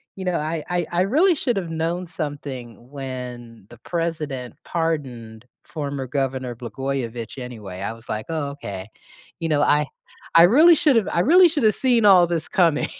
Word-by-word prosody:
You 190 Hz, -, -7 dB
know, 180 Hz, -1 st, 0 dB
I 155 Hz, 0 st, -2 dB
I 175 Hz, -1 st, 0 dB
I 175 Hz, -, +1 dB
really 305 Hz, -, +4 dB
should've 200 Hz, -, -1 dB
known 165 Hz, +3 st, -2 dB
something 135 Hz, -, -7 dB
when 125 Hz, -5 st, -7 dB
the 120 Hz, -, -14 dB
president 155 Hz, -7 st, -4 dB
pardoned 125 Hz, -9 st, -3 dB, 0.2 s
former 140 Hz, -4 st, -5 dB
governor 130 Hz, -2 st, -2 dB
Blagojevich 120 Hz, 0 st, -5 dB
anyway, 105 Hz, -7 st, -8 dB
I 100 Hz, -, -3 dB
was 115 Hz, 0 st, -15 dB
like, 110 Hz, 0 st, -4 dB
"Oh 155 Hz, -3 st, -2 dB
okay." 100 Hz, -8 st, -7 dB, 0.5 s
you 165 Hz, -, -2 dB
know, 150 Hz, -2 st, +2 dB
I 150 Hz, 0 st, +3 dB, 0.5 s
I 165 Hz, -, +9 dB
really 305 Hz, -, +7 dB
should've 255 Hz, -, +3 dB
I 170 Hz, -, +2 dB
really 350 Hz, -, +6 dB
should 305 Hz, -5 st, -2 dB
have 215 Hz, -2 st, +4 dB
seen 245 Hz, -4 st, +2 dB
all 185 Hz, -4 st, +7 dB
this 165 Hz, -2 st, -2 dB
coming. 165 Hz, -5 st, +2 dB
150 Hz, 165 wpm, -22 LUFS, 125-175 Hz, 0.5 s, I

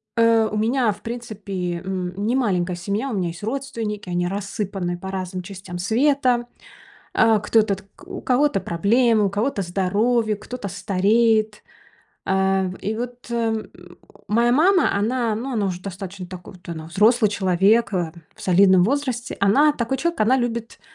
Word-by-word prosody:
э, 230 Hz, -1 st, +4 dB
у 215 Hz, -, -2 dB
меня, 230 Hz, +1 st, +2 dB
в 200 Hz, -, -10 dB
принципе, 200 Hz, -7 st, -5 dB
м, 185 Hz, -1 st, -3 dB
не 235 Hz, +4 st, +1 dB
маленькая 185 Hz, -8 st, 0 dB
семья. 200 Hz, +9 st, -3 dB
У -, -, -3 dB
меня 185 Hz, -4 st, -1 dB
есть 165 Hz, +3 st, -9 dB
родственники, 225 Hz, -5 st, -4 dB
они 175 Hz, 0 st, 0 dB
рассыпаны 195 Hz, -2 st, -3 dB
по 190 Hz, +2 st, -7 dB
разным 185 Hz, -1 st, -4 dB
частям 185 Hz, -1 st, -8 dB
света. 245 Hz, +4 st, +2 dB, 0.7 s
А, 225 Hz, -1 st, +4 dB
кто-то 215 Hz, -1 st, +2 dB
т 190 Hz, -, -15 dB, 0.2 s
у -, -, -7 dB
кого-то 255 Hz, -4 st, +2 dB
проблемы, 220 Hz, +6 st, +2 dB
у 195 Hz, -, +1 dB
кого-то 205 Hz, +2 st, -1 dB
здоровье, 210 Hz, +5 st, +1 dB
кто-то 215 Hz, +1 st, -7 dB
стареет. 210 Hz, +3 st, +1 dB, 0.6 s
А, 190 Hz, 0 st, +2 dB
в 185 Hz, 0 st, -4 dB
и 215 Hz, +2 st, -2 dB
вот, 245 Hz, +1 st, -7 dB
э, -, -, -2 dB
м, 225 Hz, -2 st, -1 dB, 0.6 s
моя 235 Hz, +3 st, +2 dB
мама, 355 Hz, +7 st, +4 dB
она, 230 Hz, +1 st, 0 dB
ну, 260 Hz, +5 st, -4 dB
она 215 Hz, -4 st, 0 dB
уже 180 Hz, -2 st, -3 dB
достаточно 190 Hz, 0 st, -7 dB
такой 180 Hz, +1 st, -10 dB
вот, 175 Hz, -2 st, -17 dB
она 160 Hz, -2 st, -6 dB
взрослый 215 Hz, +5 st, +3 dB
человек, 200 Hz, +3 st, +2 dB
э, 170 Hz, -3 st, -1 dB, 0.2 s
в 220 Hz, -, -14 dB
солидном 185 Hz, -1 st, +5 dB
возрасте. 255 Hz, +1 st, -1 dB
Она 280 Hz, +10 st, +4 dB
такой 250 Hz, -1 st, -2 dB
человек. 340 Hz, +3 st, -2 dB
Она 230 Hz, +5 st, +4 dB
любит, 235 Hz, -2 st, -3 dB
210 Hz, 165 wpm, -22 LUFS, 190-235 Hz, 0.7 s, солидном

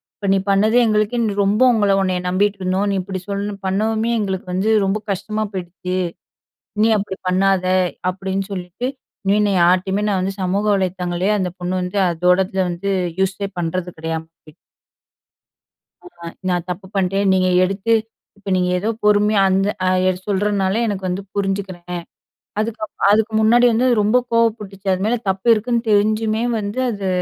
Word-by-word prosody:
இப்ப 200 Hz, -, -3 dB
நீ 195 Hz, -, +3 dB
பண்ணது 210 Hz, +3 st, +3 dB
எங்களுக்கே 215 Hz, +1 st, +1 dB, 0.2 s
ரொம்ப 205 Hz, +4 st, +1 dB
உங்கள 205 Hz, -3 st, +2 dB
உன்னை 185 Hz, -1 st, 0 dB
நம்பிட்டு 200 Hz, +2 st, +1 dB
இருந்தோம். 185 Hz, +2 st, 0 dB
நீ -, -, 0 dB
இப்டி 185 Hz, 0 st, -5 dB
சொல்ல 200 Hz, +1 st, -2 dB
பண்ணவுமே, 220 Hz, +4 st, 0 dB
எங்களுக்கு 190 Hz, -3 st, -3 dB
வந்து 195 Hz, +4 st, +1 dB
ரொம்ப 195 Hz, +2 st, 0 dB
கஷ்டமா 215 Hz, +3 st, -2 dB
போயிடுச்சு. 180 Hz, 0 st, -5 dB, 0.8 s
இனி 220 Hz, +2 st, +4 dB
அப்டி 195 Hz, -1 st, -4 dB
பண்ணாத 190 Hz, 0 st, +2 dB, 0.4 s
அப்டின்னு 195 Hz, +1 st, -4 dB
சொல்லிட்டு, 185 Hz, +6 st, -4 dB, 0.4 s
இனி 200 Hz, +2 st, +4 dB
நான் 195 Hz, -2 st, +1 dB
யார்ட்டேயுமே 185 Hz, +3 st, +2 dB
நான் 195 Hz, -2 st, +1 dB
வந்து 195 Hz, +1 st, -2 dB
சமூக 190 Hz, +3 st, 0 dB
வலைத்தங்களையே 185 Hz, 0 st, -1 dB
அந்த 185 Hz, -2 st, -1 dB
பொண்ணு 180 Hz, +1 st, -3 dB
வந்து 180 Hz, +3 st, -3 dB
அதோடத 180 Hz, +3 st, +1 dB
வந்து 175 Hz, +3 st, -4 dB, 0.3 s
யூஸே 195 Hz, +1 st, 0 dB
பண்றது 175 Hz, +1 st, -2 dB
கெடையாம 160 Hz, 0 st, -4 dB
போயிச்சு. 155 Hz, -2 st, -20 dB, 1.5 s
ஆமா. 170 Hz, -, -11 dB, 0.2 s
நான் 175 Hz, -1 st, -1 dB
தப்பு 185 Hz, +2 st, -5 dB
பண்ட்டேன் 195 Hz, +1 st, +1 dB
நீங்க 185 Hz, -1 st, +2 dB, 0.2 s
எடுத்து 195 Hz, +4 st, 0 dB, 0.4 s
இப்ப 200 Hz, 0 st, -8 dB
நீங்க 180 Hz, 0 st, +1 dB
ஏதோ 210 Hz, +4 st, -1 dB
பொறுமையா 210 Hz, 0 st, +4 dB
அந்த 195 Hz, +1 st, +2 dB, 0.6 s
சொல்றனால, 200 Hz, -1 st, 0 dB
எனக்கு 195 Hz, -2 st, -3 dB
வந்து 180 Hz, +2 st, -2 dB
புரிஞ்சிக்குறேன். 190 Hz, -3 st, -3 dB, 0.6 s
அதுக்கு 220 Hz, +1 st, -3 dB
அப்பறம் 200 Hz, -, 0 dB
அதுக்கு 220 Hz, +1 st, +2 dB
முன்னாடி 235 Hz, +3 st, +5 dB
வந்து 240 Hz, +3 st, +2 dB
ரொம்ப 210 Hz, +4 st, +3 dB, 0.2 s
கோவப்பட்டுச்சு. 210 Hz, -4 st, 0 dB
அது 185 Hz, +1 st, -1 dB
மேல 230 Hz, +3 st, +1 dB
தப்பு 190 Hz, +4 st, -1 dB
இருக்குன்னு 230 Hz, +2 st, -1 dB
தெரிஞ்சுமே 215 Hz, +2 st, +2 dB, 0.2 s
வந்து 205 Hz, +3 st, -4 dB
அது 200 Hz, -3 st, -3 dB
195 Hz, 150 wpm, -19 LUFS, 185-210 Hz, 1.5 s, முன்னாடி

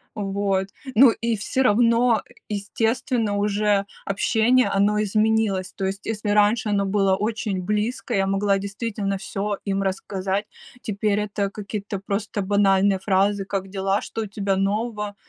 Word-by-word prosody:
вот. 195 Hz, -1 st, -1 dB, 0.3 s
Ну 245 Hz, +1 st, +8 dB
и 230 Hz, -1 st, -2 dB
всё 260 Hz, +5 st, 0 dB
равно, 235 Hz, 0 st, +3 dB, 0.3 s
естественно, 220 Hz, +1 st, -1 dB
уже 205 Hz, -1 st, +1 dB, 0.2 s
общение, 225 Hz, +4 st, +2 dB
оно 205 Hz, +2 st, +2 dB
изменилось. 215 Hz, -2 st, +1 dB
То 195 Hz, -, -3 dB
есть, 195 Hz, +2 st, -4 dB
если 210 Hz, -1 st, -2 dB
раньше 210 Hz, +2 st, +3 dB
оно 200 Hz, -1 st, +1 dB
было 195 Hz, -1 st, +2 dB
очень 210 Hz, -2 st, -2 dB
близкое, 210 Hz, +2 st, -1 dB
я 195 Hz, 0 st, +1 dB
могла 195 Hz, 0 st, +2 dB
действительно 200 Hz, 0 st, -3 dB
всё 205 Hz, 0 st, -3 dB
им 195 Hz, -1 st, -1 dB
рассказать, 195 Hz, +1 st, -2 dB, 0.4 s
теперь 210 Hz, -1 st, 0 dB
это 205 Hz, -1 st, -2 dB
какие-то 205 Hz, -1 st, -5 dB
просто 200 Hz, +1 st, -3 dB
банальные 195 Hz, 0 st, +3 dB
фразы: 195 Hz, +1 st, +1 dB
"Как 195 Hz, -1 st, -3 dB
дела? 195 Hz, +1 st, 0 dB
Что 225 Hz, -, -4 dB
у -, -, -5 dB
тебя 200 Hz, -1 st, -1 dB
нового?" 210 Hz, +1 st, -1 dB
205 Hz, 140 wpm, -23 LUFS, 195-215 Hz, 0.4 s, Ну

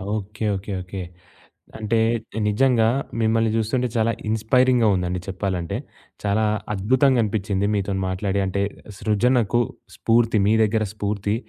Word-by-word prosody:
Okay. 105 Hz, +1 st, -5 dB
Okay. 100 Hz, +1 st, -5 dB
Okay. 90 Hz, +1 st, -6 dB, 0.8 s
అంటే 110 Hz, +1 st, 0 dB, 0.5 s
నిజంగా 115 Hz, +2 st, +3 dB, 0.4 s
మిమ్మల్ని 115 Hz, 0 st, +2 dB
చూస్తుంటే 115 Hz, +3 st, 0 dB
చాలా 115 Hz, 0 st, +2 dB, 0.2 s
ఇన్స్పైరింగ్‌గా 120 Hz, +2 st, +3 dB
ఉందండి 90 Hz, 0 st, -2 dB
చెప్పాలంటే. 95 Hz, -3 st, -2 dB, 0.5 s
చాలా 105 Hz, +1 st, +1 dB, 0.3 s
అద్భుతంగనిపించింది 105 Hz, -3 st, +1 dB
మీతోని 100 Hz, -1 st, -1 dB
మాట్లాడి, 95 Hz, +1 st, -1 dB
అంటే 95 Hz, +1 st, -1 dB, 0.4 s
సృజనకు 120 Hz, +1 st, +2 dB, 0.3 s
స్ఫూర్తి 115 Hz, -1 st, +2 dB
మీ 105 Hz, -, +4 dB
దగ్గర 110 Hz, 0 st, +1 dB
స్ఫూర్తి 105 Hz, 0 st, -2 dB
105 Hz, 110 wpm, -23 LUFS, 100-115 Hz, 0.8 s, మీ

